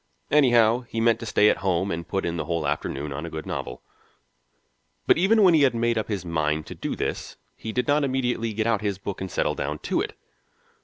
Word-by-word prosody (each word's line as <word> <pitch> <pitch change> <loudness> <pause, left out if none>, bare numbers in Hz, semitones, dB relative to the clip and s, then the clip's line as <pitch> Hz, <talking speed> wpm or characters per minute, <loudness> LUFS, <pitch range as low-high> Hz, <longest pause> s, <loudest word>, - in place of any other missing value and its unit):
Anyhow, 120 -5 +5
he 115 - -3
meant 115 0 +3
to 115 - -7
stay 105 0 +4
at - - +3
home 95 0 0
and 85 0 -4
put 95 - -2
in 85 - -2
the 80 - -3
whole 85 -1 -2
afternoon 70 0 -3
on 70 - -5
a 85 - -5
good 80 -1 -6
novel. 60 - -5 1.2
But - - +4
even 210 +4 +4
when 180 -3 +6
he 155 - +5
had 130 -4 +3
made 115 0 +1
up 110 - -2
his 100 -5 -3
mind 75 -2 -1
to - - -8
do - - -4
this - - -4 0.2
he 110 - -6
did 125 +2 -1
not 145 +1 +3
immediately 125 -4 -1
get 110 +1 -1
out 115 -3 +1
his 100 -3 -2
book 100 0 -6
and 95 - -4
settle - - 0
down 75 +2 -3
to - - -1
it. - - -5
110 Hz, 230 wpm, -25 LUFS, 85-120 Hz, 1.2 s, when